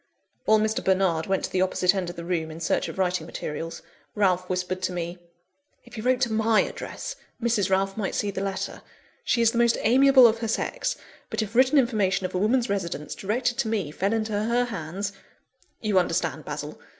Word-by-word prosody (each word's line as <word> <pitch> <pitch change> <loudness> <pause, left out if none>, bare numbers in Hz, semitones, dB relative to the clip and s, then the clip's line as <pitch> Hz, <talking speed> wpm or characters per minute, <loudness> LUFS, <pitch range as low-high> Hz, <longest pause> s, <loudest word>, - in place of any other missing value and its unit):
While 220 - +5
Mr. 215 0 0
Bernard 185 -4 +2
went 190 -1 0
to - - -3
the 185 - +1
opposite 185 0 +2
end 185 -3 -2
of 175 - -7
the 170 -1 -7
room, 170 -3 -1
in 160 +1 -8
search 165 - 0
of - - -7
writing 180 -3 0
materials, 165 +2 -5 0.3
Ralph 185 -3 +1
whispered 185 0 -2
to 185 - -1
me 175 0 -4 0.7
"If - - -17
he 220 - -5
wrote 255 +2 +2
to 235 -4 +1
my 220 0 +3
address, - - -5 0.2
Mrs. 230 -5 +1
Ralph 195 +1 +1
might 205 -3 -2
see 205 - 0
the 190 - -4
letter. 195 0 -3 0.4
She 235 - +2
is 230 - +5
the 235 - -1
most 235 0 +4
amiable 265 +1 +6
of 230 -1 +4
her 225 - -2
sex; - - -1 0.3
but - - -1
if 210 0 -7
written 260 +4 +4
information 210 -7 +2
of - - -4
a 180 - 0
woman's 235 +5 +2
residence, 170 -7 -3
directed 240 +4 -1
to - - +1
me, 205 -9 -1
fell 195 +6 -1
into 220 -1 -1
her 230 +4 +1
hands 200 -1 -4 0.7
you 210 -4 +3
understand, 180 - -1
Basil! - - -6
200 Hz, 205 wpm, -25 LUFS, 185-230 Hz, 0.7 s, amiable